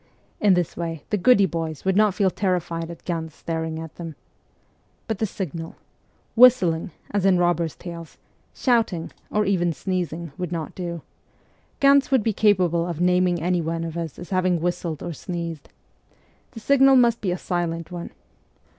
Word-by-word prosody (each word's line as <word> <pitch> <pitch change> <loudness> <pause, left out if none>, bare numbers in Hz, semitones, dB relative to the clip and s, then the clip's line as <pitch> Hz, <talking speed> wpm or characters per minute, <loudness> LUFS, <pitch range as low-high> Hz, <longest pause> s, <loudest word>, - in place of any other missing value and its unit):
In 205 -3 +4
this 175 -2 -1
way 165 -3 -4
the - - +3
goody 200 0 +5
boys 165 -3 -4
would 190 0 +2
not 210 -2 +4
feel 190 -1 +2
terrified 175 -4 -2
at 170 - -10
Ganz 160 -3 -4
staring 160 -1 -3
at 160 -1 -8
them. 165 -3 -7 0.9
But 220 -4 -2
the 220 - +1
signal? 165 -4 -6 0.6
Whistling, 225 -10 +5 0.2
as 205 -2 0
in 190 -2 +4
robbers' 175 -2 +1
tales, 170 -3 -9 0.3
shouting, 225 -10 0 0.2
or 210 0 +1
even 175 -3 +1
sneezing 170 0 -3
would 180 -2 -3
not 165 -3 -4
do: 170 -3 -5 0.8
Ganz 275 0 +5
would 265 -5 +3
be 225 - +1
capable 180 -5 +2
of 170 -3 -4
naming 180 -1 +2
anyone 165 -2 0
of 165 -1 -5
us 165 -3 -4
as 175 - -10
having 185 -2 +2
whistled 170 -2 -3
or 175 - -4
sneezed. 170 -2 -6 0.8
The 230 - -8
signal 270 +3 +5
must 235 -2 +4
be 195 - -1
a 180 - -1
silent 170 -2 -3
one. 175 -1 -6
175 Hz, 165 wpm, -23 LUFS, 165-195 Hz, 0.9 s, goody